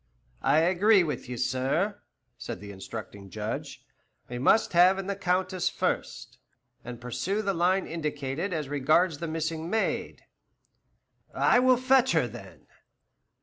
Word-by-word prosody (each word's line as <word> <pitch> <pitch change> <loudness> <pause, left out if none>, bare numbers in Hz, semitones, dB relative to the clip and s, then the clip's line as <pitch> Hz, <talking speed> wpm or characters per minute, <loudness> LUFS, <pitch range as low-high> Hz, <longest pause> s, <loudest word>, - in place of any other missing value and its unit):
"I 140 - +3
agree 190 +3 +4
with 150 -5 -4
you, 125 - -5
sir," 135 - -1 0.3
said - - -7
the 100 +1 -9
instructing 100 0 -9
judge: 105 +2 -6 0.4
"we 120 0 -5
must 180 - +3
have 180 +2 +6
in 195 - -4
the 200 +1 -2
Countess 185 -1 0
first, - - -3 0.4
and 120 -1 -8
pursue 125 - -2
the 195 -1 0
line 185 +2 +1
indicated 150 +1 -3
as 155 -4 -3
regards 145 +3 +2
the 170 - -4
missing 160 +1 -3
maid." 220 +3 -2 1.1
"I - - +4
will 255 0 +4
fetch 260 +1 +3
her, - - +2
then. - - -12
165 Hz, 140 wpm, -27 LUFS, 130-195 Hz, 1.1 s, have